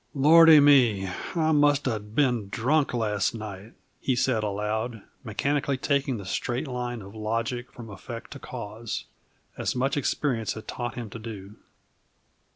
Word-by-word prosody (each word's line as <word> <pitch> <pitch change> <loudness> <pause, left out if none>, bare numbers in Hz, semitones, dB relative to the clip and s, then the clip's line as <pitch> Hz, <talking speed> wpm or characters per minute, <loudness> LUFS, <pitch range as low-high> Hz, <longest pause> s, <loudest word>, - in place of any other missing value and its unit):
"Lordy 160 +2 +8
me! 125 -9 +5 0.3
I 160 -1 +2
must 145 -1 +3
have 105 -3 -3
been 120 -8 +1
drunk 140 +8 +1
last 105 -3 0
night," 105 0 -8 0.3
he 130 - 0
said 125 -3 +1
aloud, 105 +2 -2 0.2
mechanically 140 +4 -1
taking 140 -1 0
the 100 - -8
straight 120 +8 -2
line 125 -3 -4
of 100 +1 -11
logic 115 +3 -3
from 120 -2 -10
effect 115 +4 -9
to 140 - -8
cause, 115 -2 -6 0.5
as - - -1
much 135 +2 0
experience 125 -4 -1
had 110 - -10
taught 120 -2 -4
him 115 -4 -6
to 115 - -7
do. 105 -3 -8
120 Hz, 150 wpm, -26 LUFS, 110-135 Hz, 0.5 s, Lordy